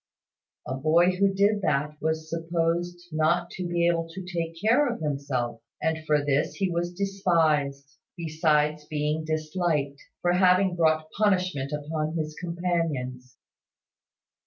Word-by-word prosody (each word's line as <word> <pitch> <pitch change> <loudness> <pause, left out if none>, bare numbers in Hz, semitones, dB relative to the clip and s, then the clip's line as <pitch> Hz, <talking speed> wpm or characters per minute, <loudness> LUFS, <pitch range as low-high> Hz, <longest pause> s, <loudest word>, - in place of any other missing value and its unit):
A - - -2
boy 160 +6 +3
who 195 +2 +2
did 205 +2 +2
that 150 -2 0
was 160 0 -1
supposed 170 +1 -1
not 170 +3 +1
to 180 -1 -4
be 170 0 +1
able 165 -1 0
to 180 +2 -8
take 165 -2 -4
care 235 +9 +3
of - - -5
himself; 135 -6 -2 0.2
and 160 0 -1
for 150 -1 +2
this 145 0 +1
he 195 -3 0
was 170 +1 -1
despised, 160 -7 0 0.2
besides 155 -2 +1
being 150 +1 -1
disliked, 155 -2 -1 0.2
for 175 0 +3
having 185 0 +4
brought 155 -2 +2
punishment 185 -9 +1
upon 155 +2 -3
his 155 -1 -3
companions. 165 -8 -2
165 Hz, 135 wpm, -26 LUFS, 150-175 Hz, 0.2 s, having